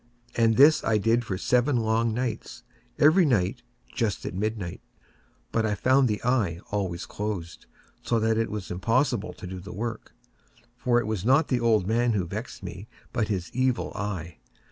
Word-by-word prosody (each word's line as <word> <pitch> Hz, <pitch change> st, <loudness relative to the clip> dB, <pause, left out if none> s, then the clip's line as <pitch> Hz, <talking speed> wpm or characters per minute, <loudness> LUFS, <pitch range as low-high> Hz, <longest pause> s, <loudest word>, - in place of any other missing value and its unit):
And 115 Hz, -1 st, +3 dB
this 145 Hz, +4 st, +7 dB
I 110 Hz, -, +2 dB
did 115 Hz, +3 st, +2 dB
for 95 Hz, -5 st, -3 dB
seven 125 Hz, +7 st, +2 dB
long 115 Hz, 0 st, +1 dB
nights—every 145 Hz, -, 0 dB
night 120 Hz, -, +1 dB, 0.3 s
just 115 Hz, -5 st, -1 dB
at -, -, -4 dB
midnight—but 105 Hz, +2 st, -5 dB
I 105 Hz, -2 st, 0 dB
found 130 Hz, +3 st, +3 dB
the 105 Hz, -2 st, -1 dB
eye 110 Hz, -9 st, +1 dB
always 95 Hz, -4 st, -2 dB
closed; 100 Hz, -5 st, -5 dB, 0.3 s
and -, -, -19 dB
so -, -, +2 dB
it 110 Hz, 0 st, +1 dB
was 105 Hz, -4 st, -5 dB
impossible 115 Hz, +4 st, 0 dB
to 105 Hz, -, -10 dB
do 90 Hz, 0 st, -6 dB
the 95 Hz, -, -9 dB
work; 115 Hz, +3 st, -5 dB, 0.6 s
for 120 Hz, -1 st, +2 dB
it 120 Hz, -, -2 dB
was 105 Hz, -4 st, -2 dB
not 135 Hz, +7 st, +3 dB
the 125 Hz, -, +2 dB
old 115 Hz, -5 st, +3 dB
man 115 Hz, +3 st, +2 dB
who 95 Hz, -4 st, 0 dB
vexed 105 Hz, +4 st, -7 dB
me, 90 Hz, +3 st, -7 dB, 0.3 s
but 115 Hz, -4 st, 0 dB
his 95 Hz, -5 st, -3 dB
Evil 130 Hz, -1 st, 0 dB
Eye. 90 Hz, -5 st, -5 dB
110 Hz, 165 wpm, -26 LUFS, 100-120 Hz, 0.6 s, this